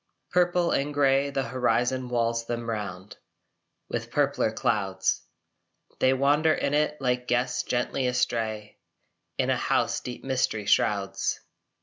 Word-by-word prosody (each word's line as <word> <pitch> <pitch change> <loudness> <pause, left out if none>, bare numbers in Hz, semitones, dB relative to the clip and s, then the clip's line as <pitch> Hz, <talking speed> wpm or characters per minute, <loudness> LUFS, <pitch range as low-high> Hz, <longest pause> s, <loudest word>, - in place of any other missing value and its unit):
Purple 175 -1 +2
and 145 +1 0
grey 140 0 +3
the 135 -1 -1
horizon 125 +1 0
walls 115 -1 0
them 120 0 -3
round 100 -4 -5 0.7
With - - -4
purpler - - +1
clouds. - - 0 0.8
They 130 - +4
wander 145 +4 +3
in 140 - -1
it 150 0 +1
like 125 -1 -1
guests 125 +1 +1
gently 125 +1 -1
astray 110 -4 -2 0.6
In - - +1
a - - +2
house - - +1
deep 125 - -8
mystery 130 -5 -1
shrouds. 100 -1 +1
125 Hz, 125 wpm, -27 LUFS, 115-140 Hz, 0.8 s, They